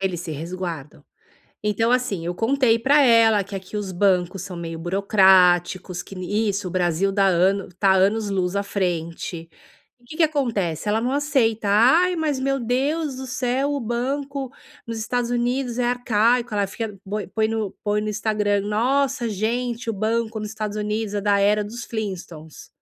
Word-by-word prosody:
Eles 185 -3 -2
se 170 - -6
resguardam. 165 -2 -6 0.6
Então 225 +3 +1
assim, 250 -9 0
eu 175 +1 -3
contei 230 +1 +2
pra 285 +5 +4
ela 230 -5 +5
que 200 +1 -8
aqui 190 +2 -6
os 200 -2 -4
bancos 180 -1 +1
são 185 -2 -7
meio 165 -1 -5
burocráticos, 180 -1 +3
que - - -12
n 205 +4 -1
isso, 195 -1 -2
o - - -6
Brasil 180 +2 +1
dá 195 0 +2
anos 190 +1 +1
tá 195 -2 +4
anos-luz 195 -1 +1
à 200 - 0
frente 170 -3 -3 0.5
e 240 - -24
que 310 - -10
que 335 - +4
acontece, 215 - -1
ela 215 +2 +2
não 250 +2 -1
aceita. 260 -8 +1
"Ai, 270 - +4
mas 300 -4 0
meu 275 +1 0
Deus 275 +5 -1
do 265 - -6
céu, 260 +3 -1
o 285 - -1
banco 270 +3 -3 0.4
nos 230 - -4
Estados 240 +2 -2
Unidos 245 0 -1
é 245 - +1
arcaico", 240 -1 +1
ela 200 -1 +1
fica, 210 0 -6
põe 210 +1 -2
põe 220 +2 0
no 220 -3 -2
põe 210 0 0
no 215 - -2
Instagram: 210 -1 0
"Nossa, 250 +2 +1
gente, 230 +3 -2
o 225 - 0
banco 220 +2 -1
nos 210 - -5
Estados 215 -1 -4
Unidos 210 0 -2
é 205 - -1
da 200 0 +2
era 210 +1 +3
dos 235 +3 -7
Flintstones". 180 -8 -7
210 Hz, 175 wpm, -22 LUFS, 190-245 Hz, 0.6 s, ela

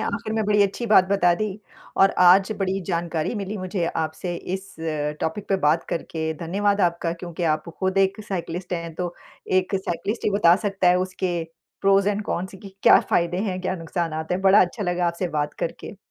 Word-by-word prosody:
आखिर 225 -2 -3
में 220 -1 0
बड़ी 210 0 +4
अच्छी 200 +4 -1
बात 205 -4 +6
बता 195 -3 +3
दी 215 +5 -1 0.6
और 195 - +6 0.2
आज 190 +3 +6
बड़ी 195 0 -1
जानकारी 170 0 -2
मिली 205 0 -4
मुझे 185 -1 -2
आपसे 160 +2 -3 0.2
इस 190 -3 -8
अ, 150 -2 -2
टॉपिक 195 +6 -3
पे 195 - +2
बात 155 +3 +3
करके। 160 -1 -3
धन्यवाद 200 +4 0
आपका 170 -2 +1
क्योंकि 170 0 -7
आप 155 +2 -8
खुद 190 0 0
एक 195 +2 +2
साइक्लिस्ट 180 -1 -4
हैं, 170 -2 -4
तो 175 0 -4 0.5
एक 185 +2 -6
साइक्लिस्ट 195 +3 -3
ही - - +2
बता 195 -4 +5
सकता 195 -2 +2
है 180 0 +4
उसके 185 -2 -2 0.4
प्रोस 195 0 +4
एंड 205 0 0
कॉन्स 185 +2 -3
की 195 -1 -12
क्या - - +8
फ़ायदे 170 +1 +2
हैं, 185 -1 -2
क्या 185 0 -2
नुकसानात 165 -1 -3
हैं, 180 - 0
बड़ा 195 +1 +6
अच्छा 185 +4 0
लगा 180 -1 0
आपसे 170 +1 -2
बात 145 0 -1
करके। 185 - -5
185 Hz, 195 wpm, -23 LUFS, 170-195 Hz, 0.6 s, क्या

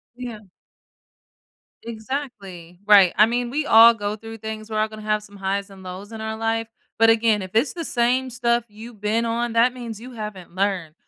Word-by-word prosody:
Yeah. 245 -3 -7 1.4
Exactly. 220 -8 -7
Right, 200 -4 +7
I 210 - +7
mean, 240 +1 -1
we 295 +3 -2
all 230 -1 +8
go 205 -1 -3
through 225 +1 -10
things, 220 0 -7
we're 215 -1 -2
all 215 - +2
gonna 215 0 -10
have 215 0 -1
some 205 -1 -14
highs 195 +1 -2
and 195 -1 -14
lows 185 +4 -8
in 220 - -7
our 220 0 -4
life, 225 0 -1 0.3
but, 225 0 +6
again, 225 -2 +3
if 185 -1 -7
it's 235 +6 +2
the 340 - -5
same 255 -1 +1
stuff 240 -1 0
you've 215 +1 -12
been 220 +3 0
on, 235 0 -1
that 235 +2 +4
means 230 -4 -7
you 250 +2 -10
haven't 210 -6 -8
learned. 190 -4 -1
220 Hz, 195 wpm, -22 LUFS, 205-235 Hz, 1.4 s, all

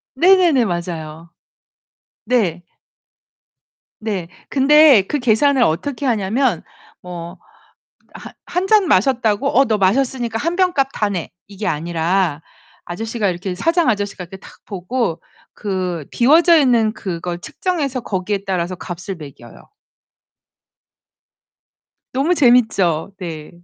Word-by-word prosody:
네네네. 345 -5 +4
맞아요. 170 -3 -5 1.0
네. 185 -9 0 1.4
네. 205 -6 -4 0.2
근데 285 -3 +6
그 295 - -1
계산을 255 +2 +3
어떻게 255 - -1
하냐면 225 - 0 0.4
뭐 175 0 -8 0.8
하 - - -10
1 360 +2 -2
잔 410 -3 +4
마셨다고 240 - +2
"어 270 - +6
너 220 - +1
마셨으니까 235 +3 0
1 335 +8 -2
병 370 -1 +2
값 275 -4 +1
다 210 -1 0
내." 180 -4 -4 0.2
이게 200 +1 -7
아니라 165 0 -1 0.5
아저씨가 220 +4 -3
이렇게 180 +1 -3
사장 330 - +1
아저씨가 205 -3 -3
이렇게 190 +2 -11
탁 - - -16
보고 200 -1 -3 0.3
그 185 -6 -4
비워져 325 +7 +5
있는 240 -7 +3
그걸 175 -2 -5
측정해서 285 - -3
거기에 200 -1 -3
따라서 185 -1 -2
값을 175 +2 -7
매겨요. 140 -7 -13 2.5
너무 285 +8 +1
재밌죠? 220 - +3
네. 160 -5 -7
210 Hz, 230 characters per minute, -19 LUFS, 175-270 Hz, 2.5 s, 근데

